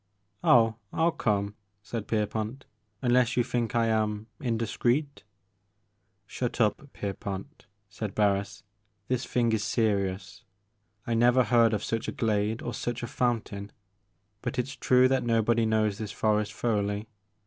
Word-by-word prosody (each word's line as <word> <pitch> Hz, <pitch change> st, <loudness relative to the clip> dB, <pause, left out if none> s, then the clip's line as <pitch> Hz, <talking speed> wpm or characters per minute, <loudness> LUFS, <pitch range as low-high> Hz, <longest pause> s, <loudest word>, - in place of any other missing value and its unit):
"Oh, 115 Hz, -2 st, +5 dB
I -, -, -3 dB
'11 165 Hz, 0 st, +2 dB
come," 100 Hz, -2 st, 0 dB, 0.3 s
said 105 Hz, +1 st, -5 dB
Pierpont, 110 Hz, +4 st, -2 dB, 0.4 s
"unless 125 Hz, +1 st, +3 dB
you 120 Hz, -, +4 dB
think 120 Hz, -2 st, -2 dB
I 115 Hz, -1 st, +3 dB
am 110 Hz, -1 st, 0 dB
indiscreet 120 Hz, +4 st, -1 dB, 0.4 s
" 100 Hz, +1 st, -46 dB
" 95 Hz, -, -46 dB, 0.2 s
Shut 125 Hz, +4 st, -4 dB
up, 120 Hz, +5 st, +1 dB
Pierpont," 100 Hz, -1 st, -6 dB, 0.2 s
said 105 Hz, 0 st, -6 dB
Barris, 100 Hz, -2 st, 0 dB, 0.5 s
"this 125 Hz, 0 st, -1 dB
thing 120 Hz, -2 st, +1 dB
is 110 Hz, -2 st, 0 dB
serious; 100 Hz, -4 st, -1 dB, 0.6 s
I 120 Hz, -, -1 dB
never 120 Hz, +2 st, +5 dB
heard 115 Hz, 0 st, +4 dB
of 105 Hz, -, -3 dB
such 115 Hz, 0 st, -2 dB
a -, -, -1 dB
glade 110 Hz, 0 st, 0 dB
or -, -, -3 dB
such 120 Hz, 0 st, -3 dB
a -, -, -2 dB
fountain, 115 Hz, -5 st, -2 dB, 0.7 s
but -, -, -4 dB
it 125 Hz, +1 st, 0 dB
's 135 Hz, -, -7 dB
true 125 Hz, 0 st, +4 dB
that 130 Hz, 0 st, +1 dB
nobody 115 Hz, -1 st, +2 dB
knows 110 Hz, -2 st, +1 dB
this 105 Hz, -2 st, -4 dB
forest 105 Hz, 0 st, +1 dB
thoroughly. 105 Hz, -1 st, -1 dB
110 Hz, 150 wpm, -28 LUFS, 105-120 Hz, 0.7 s, Oh